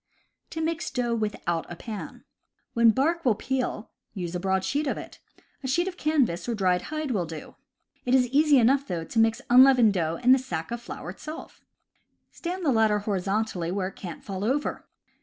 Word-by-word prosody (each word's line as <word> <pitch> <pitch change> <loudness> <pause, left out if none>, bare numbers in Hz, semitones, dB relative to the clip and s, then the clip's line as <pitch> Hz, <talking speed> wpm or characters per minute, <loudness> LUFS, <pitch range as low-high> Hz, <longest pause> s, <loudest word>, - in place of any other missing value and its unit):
To 320 - -4
Mix 330 +1 -2
Dough 245 -3 -1
without 205 -7 -2
a - - -5
Pan. 215 +3 -8 0.2
— - - -50
When 235 -1 +5
bark 320 +9 +1
will 235 -5 +3
peel, 245 -1 -3 0.2
use 175 -3 -4
a 180 - -2
broad 190 +1 0
sheet 290 +6 -1
of - - -1
it. - - -9 0.4
A 265 - -4
sheet 345 +8 +1
of 375 - -4
canvas, 265 - 0
or - - +1
a - - -2
dried 185 -3 +2
hide, 310 -2 -3
will 185 -7 -1
do. 160 -1 -8 0.5
It 250 +1 +2
is 255 -1 +4
easy 290 +2 +5
enough, 270 +4 +3
though, 170 -6 -3
to 225 +8 -2
mix 225 0 +2
unleavened 250 -4 +7
dough 165 -3 0
in 250 +5 +3
the 265 - +7
sack 165 -9 -5
of 235 0 -4
flour 180 - -7
itself. 310 - -9 0.7
Stand 360 +1 -5
the 285 - +4
latter 220 -3 +3
horizontally 200 -2 -1
where 190 -1 -1
it - - -18
can't 175 -4 -8
fall 195 -2 -5
over. 270 +7 -1
230 Hz, 200 wpm, -26 LUFS, 190-270 Hz, 0.7 s, unleavened